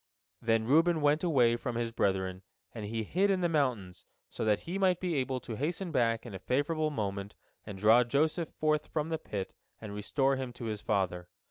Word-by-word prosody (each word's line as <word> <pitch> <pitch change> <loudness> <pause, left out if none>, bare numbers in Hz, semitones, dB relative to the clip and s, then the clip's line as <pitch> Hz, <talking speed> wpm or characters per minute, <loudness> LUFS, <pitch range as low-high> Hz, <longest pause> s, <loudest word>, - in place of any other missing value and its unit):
Then 115 -1 +2
Reuben 160 +6 +4
went 145 +3 +3
away 125 -9 +4
from 125 -1 -4
his 115 -1 -1
brethren, 95 -4 0 0.3
and 110 -3 -6
he 110 +2 -2
hid 190 - +1
in 190 -2 +2
the 175 - +3
mountains, 125 - -1 0.3
so - - -4
that 105 -2 +2
he 180 +4 -4
might 185 -2 +3
be 180 -2 -1
able 130 -2 -1
to 115 - -6
hasten 170 +5 -2
back 115 -5 +1
in 115 - -8
a 95 - -6
favorable 155 - 0
moment 100 -6 -4 0.3
and 100 -2 -6
draw 110 +5 +6
Joseph 155 +6 0
forth 155 -1 0
from 155 0 -2
the 160 -1 -2
pit 100 -9 -5 0.3
and 105 -2 -7
restore 135 +6 +1
him 130 -2 -4
to 120 -1 -8
his 105 -2 -3
father. 90 -4 -1
125 Hz, 205 wpm, -31 LUFS, 105-155 Hz, 0.3 s, draw